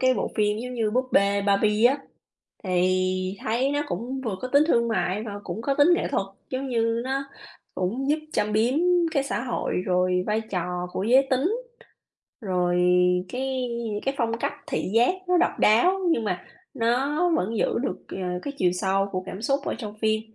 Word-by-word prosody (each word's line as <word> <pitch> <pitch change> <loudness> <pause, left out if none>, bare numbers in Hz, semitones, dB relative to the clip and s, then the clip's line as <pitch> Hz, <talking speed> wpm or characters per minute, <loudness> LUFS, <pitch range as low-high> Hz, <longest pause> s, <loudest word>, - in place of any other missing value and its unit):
cái 255 -1 +4
bộ - - -2
phim 210 0 +1
giống 250 +1 -5
như 220 -3 0
"Búp 255 +3 +1
bê 200 0 +3
Barbie" 210 +2 +3
á 275 +3 +2 0.7
thì 185 +1 +1
thấy 245 +5 +1
nó 290 0 0
cũng 240 +9 -4
vừa 205 -4 -2
có 255 - -4
tính 285 +3 +4
thương 235 -4 +3
mại 210 -2 0
và 210 - -6
cũng 190 +6 -5
có 275 +1 0
tính 290 +4 +5
nghệ - - -1
thuật, 195 - 0 0.2
giống 265 +1 -3
như 230 -1 +1
nó 270 +1 -1 0.5
cũng 240 +10 -1
giúp 310 - +2
châm 210 0 0
biếm 230 +5 +2 0.4
cái 275 - +3
xã 275 - -2
hội, 245 - -2
rồi 180 0 +2
vai 215 +1 +1
trò 180 -1 -2
của 190 - -2
giới 260 +4 +5
tính, 285 - +2 0.9
rồi 180 -3 0 0.5
cái 260 -1 -2 0.4
cái 270 - +1
phong 230 -1 0
cách - - -1
thị - - -2
giác 240 +10 +4
nó 360 - +4
độc - - +1
đáo, 355 - +4
nhưng 230 -8 +1
mà 180 -3 -2 0.3
nó 275 +9 +1
vẫn 220 +5 -1
giữ - - +1
được, 260 - -2 0.2
à, 180 -1 -3
cái 285 - -4
chiều 180 -1 +3
sâu 195 +2 0
của 185 0 -2
cảm 195 +4 -7
xúc 275 +3 +1
ở - - -2
trong 210 -3 -6
phim. 215 0 +2
225 Hz, 195 wpm, -25 LUFS, 190-260 Hz, 0.9 s, tính